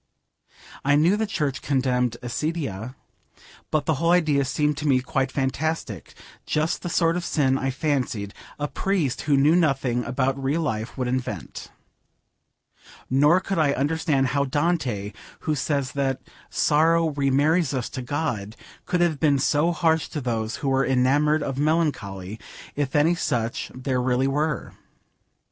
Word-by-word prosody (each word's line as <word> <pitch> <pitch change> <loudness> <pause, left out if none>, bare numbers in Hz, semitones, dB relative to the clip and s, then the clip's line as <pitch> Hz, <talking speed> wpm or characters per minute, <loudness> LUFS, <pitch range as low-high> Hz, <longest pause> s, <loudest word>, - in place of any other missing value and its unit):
I 140 +1 +3
knew 165 +7 +4
the 220 +1 -1
church 150 -9 -2
condemned 125 -3 0
accidia, 130 - -3 0.7
but 150 -2 0
the 160 - +2
whole 165 - +2
idea 155 -6 +3
seemed 150 +2 0
to 150 - -2
me 130 -3 +4
quite 130 +1 -1
fantastic, 155 +5 -3 0.3
just 155 +2 0
the 175 - -4
sort 165 0 +2
of 180 - -2
sin, 135 -5 +1
I 135 0 -1
fancied, 130 -7 -2 0.2
a 145 - -2
priest 170 -7 -1
who 145 -2 +2
knew 150 +4 +4
nothing 135 -7 +1
about 130 +2 -1
real 145 +5 +1
life 110 -6 -3
would 130 -2 -1
invent. 130 0 -4 1.4
Nor 145 +7 +5
could 195 -2 -2
I 145 -3 +3
understand 140 -1 +1
how 140 +2 +1
Dante, 130 - -1 0.3
who 155 - -1
says 140 -2 -1
that 135 -1 -1 0.3
'sorrow 160 +2 +3
remarries 145 +3 +2
us 130 -4 -2
to 130 - -5
God,' 120 -6 -3 0.3
could 180 -1 +1
have 165 -4 +1
been 145 -3 +3
so 150 +5 +2
harsh 160 -2 +1
to 150 - -5
those 115 -4 -2
who - - +2
were 135 0 +2
enamoured 145 +4 +2
of 135 0 -3
melancholy, 110 - -1 0.4
if 145 0 -2
any 150 +4 +4
such 120 -9 -2
there 130 0 -1
really 130 +1 +1
were. 150 +1 -1
140 Hz, 150 wpm, -24 LUFS, 130-155 Hz, 1.4 s, Nor